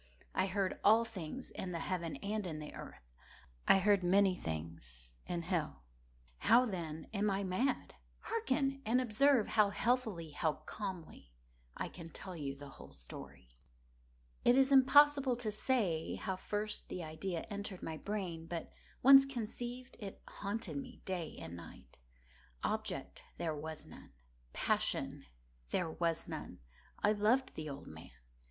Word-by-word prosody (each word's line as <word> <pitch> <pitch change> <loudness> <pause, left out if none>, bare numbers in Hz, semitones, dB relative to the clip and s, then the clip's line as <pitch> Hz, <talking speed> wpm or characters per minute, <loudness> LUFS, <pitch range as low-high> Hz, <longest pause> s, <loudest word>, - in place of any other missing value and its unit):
I 185 - +2
heard 195 -1 0
all 225 +3 +6
things 225 +3 -6
in 180 -1 -4
the - - -1
heaven 170 -2 -2
and 210 -1 -1
in 160 -3 -4
the 150 -1 -7
earth. - - -10 0.6
I - - +8
heard 200 0 +4
many 190 +2 +5
things 80 - -6
in 170 -1 -2
hell. 165 - -2 0.6
How, 240 +3 +6
then, 165 -7 -4
am 205 0 +2
I 195 0 0
mad? 220 +9 0 0.3
Hearken! 275 -11 0
and 230 +3 +3
observe 255 +1 +4
how 210 -2 +5
healthily—how 180 - 0
calmly 180 - -6 0.5
I - - -2
can 170 -2 -9
tell 185 +3 -7
you 140 -4 -3
the 140 0 -10
whole - - -12
story. - - -10 0.9
It 245 +2 +6
is 270 0 +5
impossible 275 0 +7
to 235 -3 -2
say 205 -8 0
how 190 - -2
first 210 +3 -3
the 180 - -4
idea 165 +2 -3
entered 200 -2 -4
my 160 -1 -4
brain; 180 -4 -4
but 170 -1 -4 0.3
once 270 +1 +10
conceived, 245 0 -5
it 200 -4 -7
haunted 210 +6 -3
me 255 -3 -7
day 175 -4 -3
and 85 - -7
night. 85 -7 -12 0.6
Object - - -2 0.2
there 160 -3 -1
was 155 +1 -6
none. - - -13 0.4
Passion - - 0 0.4
there 170 -3 0
was 165 0 0
none. - - -6 0.5
I 210 - +6
loved 225 +5 +2
the 155 -1 -5
old 140 0 -7
man. 80 0 -10
195 Hz, 145 wpm, -35 LUFS, 160-230 Hz, 0.9 s, once